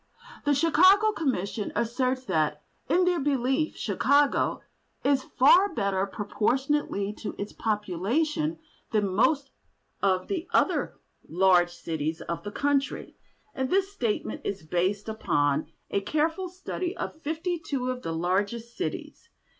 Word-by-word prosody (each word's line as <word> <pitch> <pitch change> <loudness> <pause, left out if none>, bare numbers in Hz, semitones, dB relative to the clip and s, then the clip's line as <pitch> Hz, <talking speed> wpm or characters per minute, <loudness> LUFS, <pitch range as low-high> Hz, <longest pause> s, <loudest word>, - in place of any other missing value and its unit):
The 290 0 +3
Chicago 370 +8 +5
Commission 225 - -2
asserts 255 +3 0
that 155 -6 0 0.3
in 360 +1 +4
their 355 -1 +2
belief 270 +2 0
Chicago 285 0 +2 0.4
"is 275 -1 +3 0.2
far 355 +8 +6
better 200 -2 0
proportionately 220 +1 -1
to - - -5
its 205 - -5
population 230 - -1 0.3
than 210 -3 +1
most 275 +6 +2 0.5
of 185 -2 +1
the 365 -3 -3
other - - +1 0.3
large 180 0 +4
cities 160 -2 -4
of 170 - -4
the 205 - -6
country," 280 +3 -1 0.4
and 265 -1 -2
this 390 +3 +1
statement 230 - -2
is 200 -4 -4
based 185 +6 0
upon 150 -8 0 0.2
a 200 - +1
careful 320 - 0
study 365 0 -4
of 315 - -5
fifty 325 +3 -2
two 260 -5 -2
of 250 0 -5
the 165 - -4
largest 200 +8 -1
cities. 370 - -5
250 Hz, 130 wpm, -27 LUFS, 195-310 Hz, 0.5 s, far